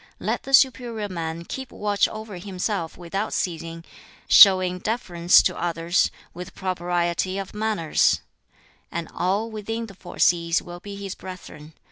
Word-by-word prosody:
Let - - -2
the 270 - -8
superior 240 -5 +2
man 165 -2 -5
keep 265 +6 -6
watch 205 -1 +1
over 215 -3 -8
himself 185 -1 -3
without 195 +5 -3
ceasing, 165 -1 -3 0.4
showing 185 -2 +7
deference 180 -5 +3
to - - 0
others, 170 0 +1 0.2
with 180 +1 -9
propriety 175 0 -1
of 195 -1 -5
manners 210 -7 +1 0.7
and 170 -1 -4
all 200 +5 -1
within 225 +2 -4
the 210 - -12
four 190 -1 -12
seas 170 -1 +3
will 175 0 -10
be 200 +2 -8
his 200 -1 -6
brethren. 160 -4 -10
185 Hz, 140 wpm, -24 LUFS, 170-210 Hz, 0.7 s, showing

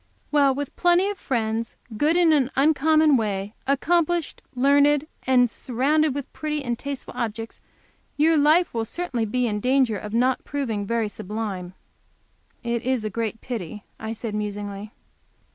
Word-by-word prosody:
"Well, 280 -3 +4
with 285 0 -5
plenty 355 +3 +3
of 405 - -9
friends, 230 -3 -2 0.2
good 305 +9 +2
in 340 -3 +5
an 270 -4 +2
uncommon 310 +1 +4
way, 205 -2 -2
accomplished, 335 +3 +1
learned, 285 +3 +4 0.2
and 250 -1 +5
surrounded 275 +5 0
with 285 -2 -6
pretty 300 -1 -3
and 240 -1 -2
tasteful 280 -1 -6
objects, 225 -2 -4 0.6
your 320 +2 +4
life 310 +4 +4
will 230 -1 -1
certainly 245 -3 -2
be 250 +3 0
in 210 -3 -1
danger 250 -3 +2
of 210 - -7
not 250 +3 +1
proving 230 -8 -3
very 230 -1 0
sublime." 200 -3 -5 0.9
"It 235 -1 -1
is 255 -3 -1
a 215 - -2
great 225 +1 -3
pity," 210 -4 -6 0.2
I 220 0 -5
said, 225 -1 -5
musingly. 205 0 -4
250 Hz, 150 wpm, -24 LUFS, 220-295 Hz, 0.9 s, in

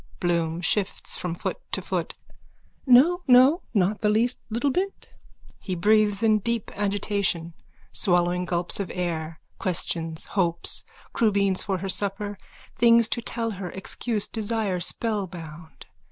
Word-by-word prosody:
BLOOM: 170 -1 0
(Shifts 200 +2 -1
from 175 -2 -4
foot 175 - -4
to - - 0
foot.) - - -3 0.7
No, 300 +9 +6
no. 260 +7 +6
Not 205 -1 +1
the 210 - +2
least 230 +4 +1
little 240 +6 0
bit. 385 +7 -3 0.5
_(He 185 -4 -3
breathes 210 +1 +3
in 215 -1 +4
deep 230 +1 -2
agitation, 200 -4 -1 0.4
swallowing 175 -1 +2
gulps 175 +1 -1
of 200 - -3
air, 165 -3 -3 0.2
questions, 165 -3 -2
hopes, 170 -4 +1 0.3
crubeens 200 -4 +2
for 195 -2 -2
her 190 +2 -5
supper, 205 +1 0 0.4
things 235 -1 +5
to 235 - -1
tell 230 0 -3
her, 190 -3 -6
excuse, 210 +3 -2
desire, 215 -4 -1
spellbound. 170 -6 -4
200 Hz, 130 wpm, -25 LUFS, 175-225 Hz, 0.7 s, No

